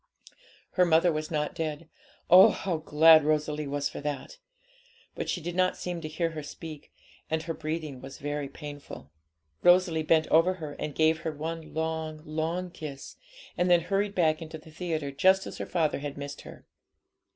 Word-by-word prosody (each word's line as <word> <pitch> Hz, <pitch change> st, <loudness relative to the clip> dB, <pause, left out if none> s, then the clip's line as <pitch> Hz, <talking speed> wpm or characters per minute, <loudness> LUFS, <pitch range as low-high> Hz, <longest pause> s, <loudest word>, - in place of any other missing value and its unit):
Her 185 Hz, -, +3 dB
mother 170 Hz, 0 st, +4 dB
was 155 Hz, 0 st, -3 dB
not 150 Hz, +1 st, -1 dB
dead; 160 Hz, -2 st, -4 dB, 0.4 s
oh, 185 Hz, +2 st, +9 dB
how 180 Hz, -4 st, -2 dB
glad 155 Hz, 0 st, +6 dB
Rosalie 150 Hz, 0 st, 0 dB
was 145 Hz, 0 st, -1 dB
for -, -, -7 dB
that! 145 Hz, -, -5 dB, 0.7 s
but -, -, -4 dB
she -, -, -1 dB
did 175 Hz, +1 st, -5 dB
not 185 Hz, 0 st, +2 dB
seem 175 Hz, -2 st, -4 dB
to 155 Hz, -, -5 dB
hear 165 Hz, +2 st, -2 dB
her 155 Hz, -1 st, -6 dB
speak, 150 Hz, +1 st, -9 dB, 0.4 s
and 160 Hz, 0 st, -1 dB
her 165 Hz, 0 st, -3 dB
breathing 155 Hz, -4 st, -5 dB
was 135 Hz, 0 st, -9 dB
very 145 Hz, -1 st, -4 dB
painful. 145 Hz, -, -10 dB, 0.5 s
Rosalie 175 Hz, -2 st, +4 dB
bent 160 Hz, 0 st, +3 dB
over 170 Hz, +4 st, +4 dB
her 155 Hz, -5 st, -7 dB
and 150 Hz, -, -4 dB
cave 160 Hz, 0 st, +3 dB
her 165 Hz, -1 st, -3 dB
one 160 Hz, +2 st, -6 dB
long, 160 Hz, -1 st, -3 dB
long 165 Hz, +4 st, -2 dB
kiss, 145 Hz, -5 st, -8 dB, 0.4 s
and 180 Hz, 0 st, +1 dB
then 175 Hz, -1 st, +6 dB
hurried 200 Hz, +3 st, -1 dB
back 160 Hz, -3 st, +2 dB
into 160 Hz, 0 st, -7 dB
the 160 Hz, +1 st, -15 dB
theatre 160 Hz, -3 st, -3 dB
just 190 Hz, +7 st, +3 dB
as -, -, -8 dB
her -, -, -4 dB
father 160 Hz, -5 st, 0 dB
had 145 Hz, 0 st, -6 dB
missed 140 Hz, 0 st, -7 dB
her. -, -, -13 dB
160 Hz, 180 wpm, -28 LUFS, 150-170 Hz, 0.7 s, oh